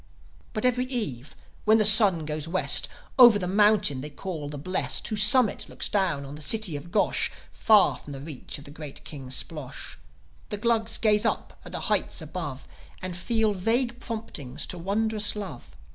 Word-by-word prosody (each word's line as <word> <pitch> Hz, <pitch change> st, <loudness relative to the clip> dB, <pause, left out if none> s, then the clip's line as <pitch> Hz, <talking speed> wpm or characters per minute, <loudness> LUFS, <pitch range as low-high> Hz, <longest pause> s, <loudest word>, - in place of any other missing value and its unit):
But 215 Hz, +1 st, -3 dB
every 250 Hz, 0 st, +1 dB
eve, 205 Hz, -, -4 dB, 0.3 s
when 215 Hz, +1 st, +4 dB
the 215 Hz, -, +2 dB
sun 200 Hz, -6 st, +5 dB
goes 155 Hz, 0 st, -3 dB
West, 185 Hz, +3 st, +2 dB, 0.3 s
Over 240 Hz, -4 st, +8 dB
the 185 Hz, -, -4 dB
mountain 200 Hz, -7 st, +3 dB
they 150 Hz, -, -7 dB
call 155 Hz, -1 st, -7 dB
The 145 Hz, -, -7 dB
Blest, 185 Hz, +7 st, -2 dB
Whose 215 Hz, -2 st, +2 dB
summit 220 Hz, +1 st, +6 dB
looks -, -, +1 dB
down 175 Hz, -9 st, -1 dB
on 135 Hz, -, -9 dB
the 150 Hz, -, -9 dB
city 195 Hz, +2 st, +3 dB
of 150 Hz, +4 st, -9 dB
Gosh, 205 Hz, -, +1 dB, 0.2 s
Far 215 Hz, -3 st, +3 dB
from 145 Hz, -, -11 dB
the 135 Hz, -, -8 dB
reach 145 Hz, -1 st, -8 dB
of 145 Hz, -, -13 dB
the 145 Hz, -, -11 dB
great 150 Hz, -2 st, -10 dB
King 135 Hz, -4 st, -9 dB
Splosh, 140 Hz, +1 st, -3 dB, 0.5 s
The 210 Hz, -, -2 dB
Glugs 225 Hz, 0 st, +1 dB
gaze 210 Hz, -1 st, +2 dB
up 225 Hz, -, -3 dB
at -, -, -10 dB
the -, -, -4 dB
heights -, -, 0 dB
above, -, -, -7 dB, 0.3 s
And 185 Hz, -1 st, -6 dB
feel 220 Hz, +3 st, 0 dB
vague 235 Hz, +5 st, 0 dB
promptings 160 Hz, -, -5 dB
to 180 Hz, -, -6 dB
wondrous 210 Hz, +4 st, 0 dB
love. 200 Hz, -12 st, -9 dB
195 Hz, 180 wpm, -25 LUFS, 150-220 Hz, 0.5 s, Over